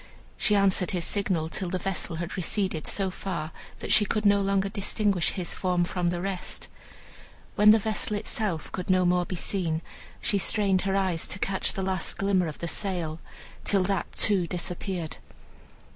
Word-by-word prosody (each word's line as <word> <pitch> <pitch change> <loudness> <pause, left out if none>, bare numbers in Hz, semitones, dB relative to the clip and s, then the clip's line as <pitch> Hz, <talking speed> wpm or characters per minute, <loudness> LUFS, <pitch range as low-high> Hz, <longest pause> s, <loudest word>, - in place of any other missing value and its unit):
She 210 - +3
answered 195 -2 +3
his 175 -4 -1
signal 185 -6 0
till 180 +2 -3
the 185 - -1
vessel 185 -2 -2
had 170 +1 -4
receded 185 -2 -1
so 195 -2 0
far 170 -5 -4 0.3
that - - -3
she 210 - +6
could 210 +1 -1
no 200 0 +5
longer 195 0 +1
distinguish 200 -2 0
his 180 -3 -2
form 180 -2 +1
from 175 0 -1
the 175 0 0
rest. 195 -1 -4 0.8
When 210 0 +6
the 215 - +9
vessel 215 0 0
itself 205 -6 -2
could 180 0 -5
no 185 -1 +4
more 180 0 +2
be 185 - -3
seen, 170 -3 -1 0.4
she 200 - +1
strained 195 -1 +3
her 190 - +1
eyes 185 -4 +1
to - - -1
catch 190 0 0
the 195 - -3
last 185 -2 -1
glimmer 195 -3 +2
of 155 - -6
the 170 - -4
sail, 170 -4 -2 0.4
till 195 -2 +3
that 195 -1 -1
too 195 -5 +2
disappeared. 180 -1 -3
190 Hz, 175 wpm, -27 LUFS, 175-200 Hz, 0.8 s, the